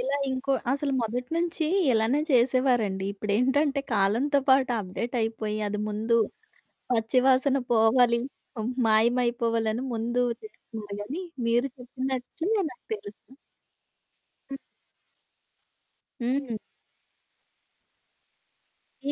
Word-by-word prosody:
ఇలా 270 +3 0
ఇంకో 260 +1 -1 0.2
అసలు 280 0 -1
మొదటి 245 +3 -3
నుంచి 335 -1 0 0.3
ఇలానే 225 +6 +2
చేసేవారండి. 245 -6 +2
ఇప్పుడేంటంటే 260 +8 +1
కాలంతో 235 +9 +2
పాటు 265 -1 +5
అప్‌డేట్ 215 +6 -5
అయిపోయి 220 -1 -2
అది 205 0 -2
ముందు, 220 +2 +1 0.7
పచ్చి 230 +1 +2
వాసన 265 +1 +4
పోవాలి, 235 +1 +4 0.7
మాయమైపోవాలని 230 +1 +2
ముందు 240 +2 0 0.2
చేస్తున్నారు 220 - -9
గానీ, 285 - -5 0.2
మీరు 240 +3 +2
చెప్పినట్టే 260 +4 -4 0.2
నాకు 250 - -16
తెలుసు. 210 +5 -11 1.2
హ్మ్. 275 - -4 1.6
హ్మ్. 255 +1 -1 2.6
ఈ - - +2
245 Hz, 90 wpm, -27 LUFS, 220-265 Hz, 2.6 s, పాటు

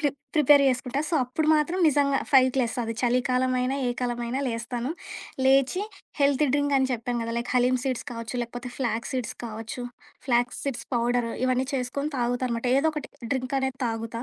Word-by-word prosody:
ప్రి 295 - +3 0.3
prepare 290 -1 +6
చేసుకుంటా. 250 +2 -1
So, 345 - -1
అప్పుడు 300 +5 -2
మాత్రం 320 +5 +1
నిజంగా 280 -1 +2
5కి 260 -1 +5
లేెస్త 240 0 -1
అది 230 - -3
చలికాలమైనా, 255 +1 +1
ఏ - - +1
కాలమైనా 240 +1 -2
లేస్తాను. 235 +3 -3 0.5
లేచి 270 +7 +4 0.4
హెల్త్ 280 +1 +4
డ్రింక్ 285 -1 +2
అని 265 0 +1
చెప్పాను 240 0 -2
గదా! 230 0 -3
లైక్ 235 - -4
హలీమ్ 250 0 +3
సీడ్స్ 255 -3 -2
కావచ్చు, 230 +1 -6
లేకపోతే 245 +1 -6
ఫ్లాక్ 235 -3 -1
సీడ్స్ 255 -3 -3
కావచ్చు, 225 +3 -6 0.4
ఫ్లాక్ 245 -1 +2
సీడ్స్ 275 -4 -4
పౌడర్ 240 0 +1 0.2
ఇవన్నీ 255 0 +1
చేసుకొని 280 +4 -2
తాగుతానమాట. 245 0 -1
ఏదో 320 - +3
ఒకటి 300 - -5 0.2
డ్రింకనేది 265 0 -1
తాగుతా. 230 +1 -4
250 Hz, 160 wpm, -26 LUFS, 240-270 Hz, 0.5 s, prepare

